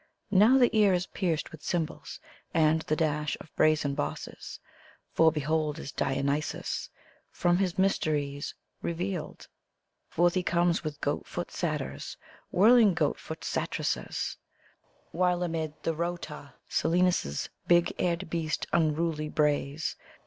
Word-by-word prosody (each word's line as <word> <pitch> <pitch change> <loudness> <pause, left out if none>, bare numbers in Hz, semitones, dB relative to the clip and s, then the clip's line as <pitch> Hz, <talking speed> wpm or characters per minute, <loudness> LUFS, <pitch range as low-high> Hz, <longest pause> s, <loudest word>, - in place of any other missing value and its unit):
Now 215 +6 +6
ihR 250 -2 +6
ear 210 -3 +5
is 180 0 +1
pierced 170 -6 -2
with 160 - -11
cymbals 165 0 -3 0.4
and 160 0 +4
the 155 - -1
dash 150 -1 0
of 160 - -14
brisen 155 -2 +3
bosses, 145 - -5 0.5
For, 160 0 +5
behold, 155 0 0
is 150 - -6
Dionysos 140 +2 -1 0.4
from 175 0 +2
his 190 -1 0
mysteries 150 -7 0 0.3
revealed! 175 0 -4 0.6
Forth 175 +1 +3
he 185 - +1
comes 175 -1 +1
with 150 -2 -5
goat - - -1
foot - - -5
Satyrs, 70 +2 -3 0.3
whirling 215 0 +6
goat 150 -4 +1
foot 160 - -8
Satyresses, - - -2 0.7
While 180 0 +1
amid 160 -3 -2
the 165 - 0
rout 170 +2 -3 0.4
Silenus' 170 - +1 0.2
big 175 0 +4
eared 175 +1 0
beast 160 -3 -1
unruly 155 -1 +1
brays. 150 0 0
165 Hz, 125 wpm, -29 LUFS, 150-175 Hz, 0.7 s, Now